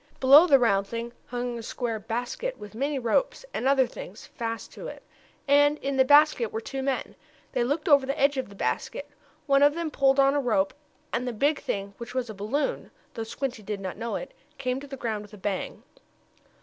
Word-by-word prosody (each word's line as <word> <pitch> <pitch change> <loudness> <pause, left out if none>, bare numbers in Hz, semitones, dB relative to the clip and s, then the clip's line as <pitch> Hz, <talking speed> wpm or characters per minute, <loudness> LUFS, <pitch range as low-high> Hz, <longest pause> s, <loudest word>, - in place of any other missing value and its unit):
Below 285 +6 +8
the 280 - +7
round 200 -6 +2
thing 235 +2 -5
hung 245 -1 -3
a - - -6
square 230 0 -3
basket, 245 - -3
with 210 0 -10
many 280 +5 -1
ropes, 265 - 0
and 260 - -1
other 270 -1 +5
things, 210 -4 -10
fast 230 -1 -5
to - - -8
it. - - -9 0.4
And 290 +1 +5
in 275 -1 -3
the 265 - +5
basket 290 -4 +5
were 220 - -2
two 265 +4 -5
men. 265 -1 -2 0.4
They - - +1
looked 290 +9 -1
over 280 -4 +5
the 275 +3 -2
edge 280 +1 +4
of 260 - -2
the 200 - -13
basket. 230 - -2 0.4
One 275 -1 +4
of 290 +1 +5
them 335 -2 -3
pulled 270 -1 +3
on 275 0 +5
a 290 - +2
rope, 215 -7 +1 0.4
and 250 +1 -1
the 245 - -2
big 285 +7 +1
thing, 200 0 -3
which 235 +1 -8
was 245 -3 -1
a - - -8
balloon, 250 - -2 0.2
though 225 - -5
Squinty 245 +1 -4
did 210 0 -4
not 190 -2 -5
know 225 0 -4
it, 270 - -6 0.2
came 255 -1 -2
to 285 - -10
the 270 -1 -7
ground 220 -4 -2
with 210 0 -12
a - - -13
bang. 195 -1 -4
255 Hz, 215 wpm, -27 LUFS, 225-280 Hz, 0.4 s, Below